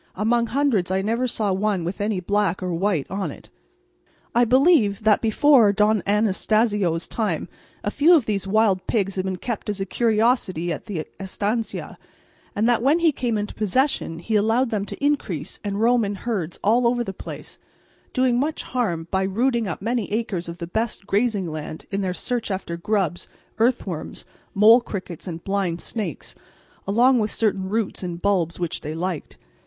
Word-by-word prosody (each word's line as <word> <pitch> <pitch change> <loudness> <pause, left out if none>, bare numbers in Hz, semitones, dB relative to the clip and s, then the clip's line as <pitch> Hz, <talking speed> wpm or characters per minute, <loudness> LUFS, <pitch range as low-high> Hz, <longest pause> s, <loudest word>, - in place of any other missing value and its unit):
Among 235 +4 +1
hundreds 235 -7 +1
I 190 +1 0
never 230 +4 0
saw 215 -4 0
one 195 -2 0
with 175 +4 -4
any 205 -2 0
black 195 0 0
or 180 -1 -2
white 175 -4 0
on 195 0 -2
it. - - -12 0.8
I 240 0 +4
believe 250 - +4
that 215 -1 +4
before 230 0 +5
Don 210 0 +2
Anastacio's 210 -3 +1
time 205 -8 -2 0.4
a 205 - -1
few 315 +8 +5
of 285 -8 +2
these 195 -3 -2
wild 200 -2 +2
pigs 200 -4 0
had 185 0 -2
been 190 -1 -2
kept 215 +3 -5
as 205 -1 -2
a 195 - -1
curiosity 215 -6 +1
at - - -8
the 175 -7 -3
estancia, 205 +4 -3 0.6
and 215 +3 +2
that 240 -2 +3
when 280 +6 +4
he 335 -2 +3
came 245 -5 -1
into 205 0 -3
possession 215 - 0
he 215 +6 -2
allowed 225 +4 +2
them 205 -2 -1
to 280 - -5
increase 225 - -1
and 200 -1 -2
roam 235 +1 +3
in 205 0 -2
herds 190 -6 -3
all 235 +4 +4
over 240 0 +1
the 195 - -5
place, - - -9 0.5
doing 255 -2 +2
much 300 +4 -1
harm 175 -10 -2
by 190 - +1
rooting 230 +4 +1
up 185 +1 -5
many 235 -1 -1
acres 205 -6 -2
of 170 - -7
the 170 - -5
best 220 +3 -3
grazing 205 -1 +1
land 155 -1 -6
in 195 0 -1
their 185 -2 -1
search 235 +5 -3
after 190 -3 -3
grubs, 175 -1 -1 0.3
earthworms, 215 -9 -1 0.3
mole 220 +4 +7
crickets, 185 -7 -7
and 165 -1 -6
blind 195 -4 -1
snakes, 195 - -5 0.5
along 240 +5 +4
with 215 -1 0
certain 195 -4 -1
roots 220 -1 -1
and 175 -2 -5
bulbs 180 -5 +1
which 175 -2 -2
they 155 +1 -5
liked. 175 -2 -4
205 Hz, 180 wpm, -23 LUFS, 185-235 Hz, 0.8 s, mole